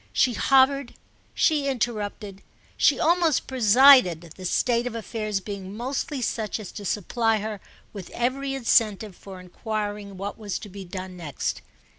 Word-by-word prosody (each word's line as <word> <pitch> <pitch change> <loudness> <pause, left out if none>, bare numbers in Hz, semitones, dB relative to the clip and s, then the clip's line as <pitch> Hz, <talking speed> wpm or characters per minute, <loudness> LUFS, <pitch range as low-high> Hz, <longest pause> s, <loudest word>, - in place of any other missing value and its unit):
She 250 - +3
hovered, 270 +1 +3 0.4
she 295 -3 +2
interrupted, 215 -5 -3 0.3
she - - +3
almost 335 -2 +2
presided, 230 - +5
the 185 - -9
state 240 +6 +1
of 240 - -6
affairs 215 -3 -3
being 200 0 -7
mostly 265 +2 -3
such 220 -1 -2
as 210 - -8
to 205 - -8
supply 225 +4 0
her 210 -1 -5 0.3
with 195 -4 -8
every 270 +3 -2
incentive 215 -5 +1
for 190 0 -11
enquiring 205 +1 -5
what 200 +3 -6
was 205 -3 -4
to 210 - -10
be 195 0 -9
done 185 0 -7
next. 150 -6 -4
215 Hz, 145 wpm, -25 LUFS, 195-250 Hz, 0.4 s, presided